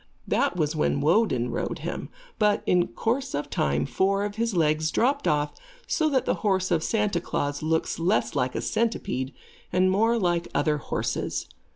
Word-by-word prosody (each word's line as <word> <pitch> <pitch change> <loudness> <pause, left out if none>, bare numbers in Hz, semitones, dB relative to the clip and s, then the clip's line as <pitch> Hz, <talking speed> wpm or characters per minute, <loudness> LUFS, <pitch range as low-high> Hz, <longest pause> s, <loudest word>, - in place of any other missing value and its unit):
That - - +1
was 155 -1 0
when 150 -2 +1
Woden 145 - +2
rode - - -2
him, - - -4 0.3
but, 210 -1 +3
in 180 -1 +3
course 245 - -2
of 145 - -4
time, 70 +1 +1
four 195 +1 +1
of 205 - -4
his 225 -1 -1
legs 155 -1 +2
dropped 280 - +1
off, 150 0 +1 0.3
so 315 -8 +1
that 265 -3 +1
the - - +2
horse 190 -3 +1
of 165 -2 +3
Santa 210 -6 0
Klaas 145 -3 -2
looks 160 +1 0
less 185 +6 +1
like 125 -2 0
a - - -1
centipede 140 - -1 0.4
and 185 +1 +3
more 225 +4 +3
like 175 -4 0
other 150 -1 +2
horses. - - -2
180 Hz, 175 wpm, -26 LUFS, 150-215 Hz, 0.4 s, but